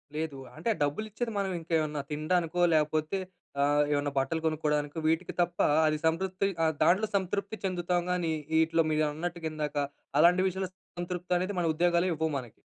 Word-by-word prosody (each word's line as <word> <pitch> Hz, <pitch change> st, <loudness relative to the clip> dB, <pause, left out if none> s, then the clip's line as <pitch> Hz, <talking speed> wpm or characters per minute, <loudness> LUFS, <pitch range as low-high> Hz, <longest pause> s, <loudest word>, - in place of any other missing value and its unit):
లేదు. 155 Hz, -3 st, -3 dB, 0.2 s
అంటే 160 Hz, -, -6 dB
ఆ -, -, -10 dB
డబ్బులు 145 Hz, +9 st, -1 dB
ఇచ్చేది, 235 Hz, +2 st, -3 dB
మనం 195 Hz, -1 st, 0 dB
ఇంకేమన్నా 155 Hz, -3 st, -1 dB
తిండానికో 165 Hz, +3 st, 0 dB
‌‌‌‌‌‌‌, 170 Hz, -, +2 dB
లాకపోతే 155 Hz, +3 st, +1 dB, 0.4 s
ఆహ్, 145 Hz, +1 st, +4 dB
ఏమైనా 145 Hz, 0 st, +1 dB
బట్టలు 160 Hz, +5 st, 0 dB
కొనుక్కోవడానికో, 150 Hz, -1 st, 0 dB
వీటికి 165 Hz, +2 st, 0 dB
తప్ప 175 Hz, 0 st, -1 dB, 0.3 s
అది 155 Hz, -, +1 dB
సంతృప్తి 185 Hz, +4 st, +1 dB, 0.2 s
ఆహ్, 160 Hz, -1 st, +3 dB
దాంట్లో 200 Hz, +5 st, +4 dB
సంతృప్తి 200 Hz, +2 st, -1 dB
చెందుతాం 180 Hz, -2 st, 0 dB
కానీ 175 Hz, -2 st, 0 dB, 0.2 s
వీటిలో, 160 Hz, +1 st, +3 dB
మీరన్నట్టుగా 160 Hz, +2 st, -1 dB
ఇందాక 150 Hz, -1 st, -3 dB, 0.4 s
అలాంటి 180 Hz, +3 st, +5 dB
విషయంలో 190 Hz, 0 st, -2 dB, 0.3 s
సంతృప్తి 180 Hz, 0 st, -2 dB
అనేది 185 Hz, +3 st, -2 dB
మన 175 Hz, -, +1 dB
ఉద్యోగాలే 175 Hz, +2 st, +2 dB
ఇవ్వవు 160 Hz, -1 st, -1 dB
మనకి. 120 Hz, -4 st, -7 dB
165 Hz, 160 wpm, -29 LUFS, 155-180 Hz, 0.4 s, అలాంటి